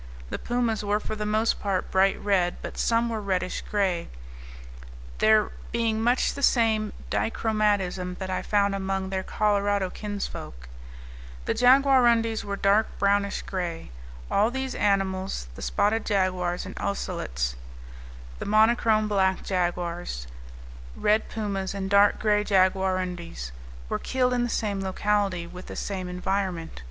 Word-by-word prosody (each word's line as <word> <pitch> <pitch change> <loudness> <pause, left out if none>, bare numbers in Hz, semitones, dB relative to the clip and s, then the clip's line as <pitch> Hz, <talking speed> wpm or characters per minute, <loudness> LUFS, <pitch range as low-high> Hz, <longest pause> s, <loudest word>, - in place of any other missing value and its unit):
The - - -3
pumas 240 -3 -1
were 205 +1 +1
for 215 - -5
the 210 0 -3
most 215 +2 +1
part 195 -2 -2
bright 195 +1 +3
red, 185 -4 +1
but - - -6
some 230 0 +2
were 225 -2 -3
reddish 185 -2 -1
gray, 190 -5 -1 1.1
there 215 -1 +4 0.2
being 225 -1 0
much 245 +3 +2
the 280 - -7
same 220 -5 +3 0.2
dichromatism 205 -5 0
that 190 -1 -4
I 185 - -1
found 200 -1 +1
among 195 -1 -2
their 190 -1 -1
Colorado 205 -2 +1
kinsfolk. 200 - -6 0.8
The - - +1
jaguarundis 245 -3 +4
were 200 0 -3
dark 200 +2 +3
brownish 200 0 +1
gray. 175 - -4 0.4
All 210 +3 +3
these 265 +1 -3
animals, 190 - 0
the - - -11
spotted 205 - +1
jaguars 185 -3 0
and 185 - -7
ocelots, 65 - -2 0.8
the - - -5
monochrome 215 0 +3
black 190 -2 +1
jaguars, 175 - -2 0.7
red 215 +1 +1
pumas, 200 -3 -3
and 195 0 -4
dark 200 0 +5
gray 210 -1 +2
jaguarundis, 185 - 0 0.4
were - - -2
killed 250 -1 0
in 245 - +1
the 240 - 0
same 205 -4 -1
locality, 195 -2 0
with 180 +2 -10
the - - -7
same 185 -3 -4
environment. 180 - -2
200 Hz, 135 wpm, -26 LUFS, 185-215 Hz, 1.1 s, dark